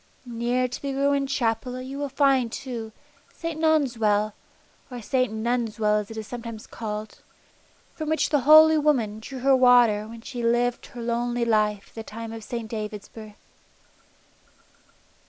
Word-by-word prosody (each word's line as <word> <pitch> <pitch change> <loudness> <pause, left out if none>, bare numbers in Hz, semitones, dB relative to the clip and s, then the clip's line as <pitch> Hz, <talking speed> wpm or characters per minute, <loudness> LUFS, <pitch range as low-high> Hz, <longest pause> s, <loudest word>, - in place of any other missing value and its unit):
Near 240 +1 -1
to 250 - -7
the 275 -1 -3
ruined 280 0 +1
Chapel 250 -1 -1
you 265 +2 -7
will 285 -1 -2
find, 270 -3 +2
too, 235 -5 -6 0.4
St. 330 -2 -5
Non's 305 -7 +2
well, 210 -1 +2 0.6
or 250 -2 -7
St. 255 +1 0
Nunn's 230 0 -2
well 210 -1 +3
as 210 - -6
it 225 - -8
is 220 - -5
sometimes 230 -1 -7
called, 215 -1 -6 0.7
from 310 -1 -5
which 315 - +1
the 295 - +4
holy 310 +3 +7
woman 240 -8 +1
drew 255 +3 -8
her 270 +1 +5
water 245 -5 +5
when 230 0 -10
she 245 0 -6
lived 240 +1 0
her 240 - -9
lonely 240 0 -1
life 210 -3 +1
at - - -26
the 225 - -6
time 225 +1 -8
of 225 -1 -8
St. 235 0 -5
David's 210 -2 -6
birth. 215 -2 -13
240 Hz, 165 wpm, -25 LUFS, 220-270 Hz, 0.7 s, holy